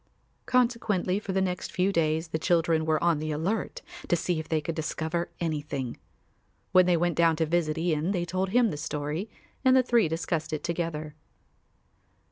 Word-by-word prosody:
Consequently 230 -7 +1
for 210 - -5
the 190 0 +1
next 180 -1 -3
few 185 +2 +1
days 160 -1 +1
the 160 - -2
children 165 -1 +2
were 155 0 +1
on 170 -3 +3
the 155 +1 -3
alert 175 +9 -2 0.2
to - - +3
see 175 -1 -1
if 155 - -7
they 160 - +2
could 165 +2 -3
discover 160 +1 -2
anything. 150 -6 -3 0.8
When 185 -1 +6
they 175 -1 +4
went 175 +1 +1
down 165 -1 +4
to 160 +1 +1
visit 160 -1 0
Ian 165 0 0
they 180 -3 0
told 185 +2 -1
him 235 +1 +3
the 150 - -4
story 150 +7 -3 0.3
and 260 -1 +5
the 260 - +5
three 235 -5 +3
discussed 160 0 -2
it 155 - -3
together. 165 -3 -3
170 Hz, 180 wpm, -28 LUFS, 155-185 Hz, 0.8 s, When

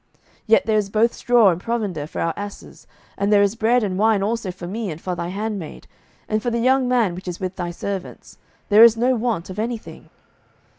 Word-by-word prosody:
07:019:019 - - -45 0.4
Yet 220 - +4
there 220 -1 +2
is 200 -1 -3
both 225 +3 +2
straw 240 -4 +4
and 170 +1 -4
provender 200 -11 -3
for - - -5
our 165 - 0
asses; 205 0 -9 0.3
and 200 +1 +1
there 205 -1 +5
is 200 0 +1
bread 230 +2 +2
and 190 -2 -2
wine 215 -2 +3
also 220 -1 -2
for 180 -1 -8
me, 210 +3 -4
and 160 -1 -6
for 180 +1 -4
thy 170 0 -4
handmaid, 200 -2 -5 0.4
and 215 0 -1
for 240 - -1
the 235 - -1
young 255 +2 +2
man 240 -7 +2
which 185 +2 -9
is 180 -1 -5
with 185 -1 -4
thy 175 -2 -4
servants: 190 +2 -7 0.3
there 215 +2 +8
is 230 -1 +7
no 250 +3 +2
want 220 -7 -2
of 190 - -7
any 235 +2 -1
thing. - - -14
210 Hz, 230 wpm, -21 LUFS, 185-230 Hz, 0.4 s, there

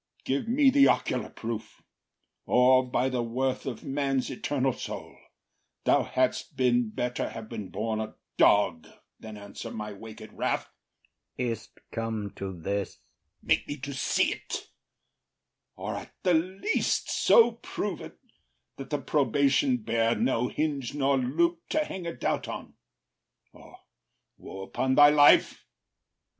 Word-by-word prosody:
Give 140 +10 -1
me 265 +3 +4
the 275 0 +6
ocular 125 -4 0
proof, 115 -1 -7 0.6
Or, 130 +1 +4
by 125 - +1
the 125 -2 -1
worth 130 +4 -2
of 120 -4 -5
man’s 135 -1 -1
eternal 130 0 -1
soul, - - -7 0.7
Thou - - +4
hadst - - -1
been 120 -2 +2
better 125 +3 -2
have 110 -1 -8
been 110 -4 -6
born 110 0 -2
a 110 - -5 0.2
dog 90 -6 +3 0.3
Than 110 -1 -9
answer 100 -1 -8
my 105 -1 -6
wak’d 110 +1 -11
wrath. - - -1 0.7
IAGO. 125 -1 0
Is’t 110 -1 -9
come 110 -3 -3
to 95 -1 -6
this? 100 +3 -3
OTHELLO. - - -37 0.4
Make - - +2
me 145 - -4
to 140 +1 -6
see’t, 135 - -1 1.0
or - - -5
at - - -8
the 180 - +3
least 185 - 0
so 465 -2 +5
prove - - -5
it, - - -10 0.6
That 135 -1 -8
the 145 - 0
probation 145 - +2
bear 115 - +1
no 125 -1 +1
hinge 145 -4 -2
nor 140 -1 +2
loop 170 +7 0
To 310 0 +1
hang 185 -9 -6
a 170 - -4
doubt - - -1
on, - - -7 0.8
or - - -15 0.6
woe 95 - -8
upon 130 +6 -1
thy 145 0 +8
life! 145 -1 +5
130 Hz, 140 wpm, -28 LUFS, 110-145 Hz, 1.0 s, thy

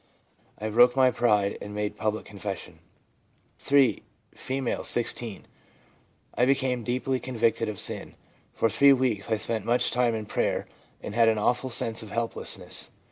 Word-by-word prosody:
I 110 - -4
broke 120 +3 +5
my 130 -1 +5
pride 105 -5 +1
and 105 0 -7
made 105 0 -2
public 110 0 -2
confession/ 100 -2 -7 0.8
(3.) 135 -6 +3 0.3
F., 130 -2 -3
16. 115 -3 -3 0.9
'I 125 - +3
became 130 -2 +1
deeply 125 +3 -1
convicted 115 -3 0
of 105 - -5
sin; - - -4 0.4
for - - +1
three 140 +5 +6
weeks 125 -7 0
I 110 - +2
spent 110 +1 -3
much 120 +1 +2
time 120 -2 +2
in 110 -1 -4
prayer, - - -1 0.4
and - - -5
had 115 0 +4
an 110 - +1
awful 125 +5 +1
sense 115 -1 -2
of 110 - -9
helplessness. 115 +1 -4
115 Hz, 150 wpm, -27 LUFS, 110-125 Hz, 0.9 s, three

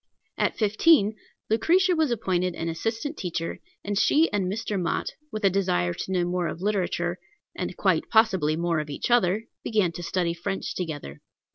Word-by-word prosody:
At - - 0
fifteen, 215 +1 +4 0.4
Lucretia 355 +11 +3
was 315 -3 +2
appointed 185 -6 0
an 165 - -3
assistant 225 - -3
teacher, 170 -3 -3 0.2
and 205 0 -2
she 315 +4 +3
and 195 -3 +1
Mr. 210 -2 -2
Mott, 175 - -1 0.2
with 215 0 -5
a - - +7
desire 90 - +1
to 190 - -5
know 180 -2 +1
more 175 -1 -1
of - - -5
literature, 180 -3 -1 0.4
and 180 0 -4
quite 185 -5 +1
possibly 190 -9 +3
more 170 -1 0
of 150 -1 -4
each 145 - -3
other, 210 -2 +3 0.2
began 210 -6 +1
to 170 - -7
study 175 -1 -1
French 190 +3 -4
together. 145 - -5
185 Hz, 170 wpm, -26 LUFS, 170-220 Hz, 0.4 s, a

